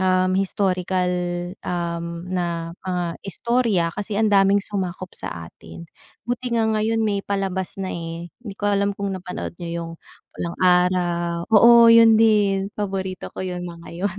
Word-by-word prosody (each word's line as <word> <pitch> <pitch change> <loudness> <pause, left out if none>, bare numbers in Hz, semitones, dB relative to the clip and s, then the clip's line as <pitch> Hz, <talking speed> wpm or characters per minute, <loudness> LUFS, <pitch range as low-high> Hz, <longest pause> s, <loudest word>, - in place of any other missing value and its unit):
um, 185 0 +2
historical, 185 -1 0 0.5
um, 170 -1 -4
na 170 -2 -2
mga 180 -1 -2 0.2
istorya 230 -1 0
kasi 205 0 -4
ang 220 -1 +2
daming 195 0 +4
sumakop 185 -2 -4
sa - - -7 0.2
atin. 85 - -12 0.4
Buti 245 0 -2
nga 225 - +2
ngayon 220 +1 +1
may 205 -2 0
palabas 195 -2 -3
na, 190 -1 -4
eh. 170 0 -6
Hindi 210 -5 -8
ko - - -7
alam 200 0 0
kung 200 -2 -3
napanood 180 -1 -6
n'yo 170 - -5
'yung 170 0 -5 0.4
Pulang 170 0 -5
Araw 175 -1 +2
oo, 235 +2 +8
'yun 230 -1 +7
din 205 -3 +3
paborito 190 -3 -4
ko - - -3
'yung 180 -1 -4
mga 170 0 -11
'yun. 190 +3 -3
190 Hz, 150 wpm, -22 LUFS, 175-205 Hz, 0.5 s, oo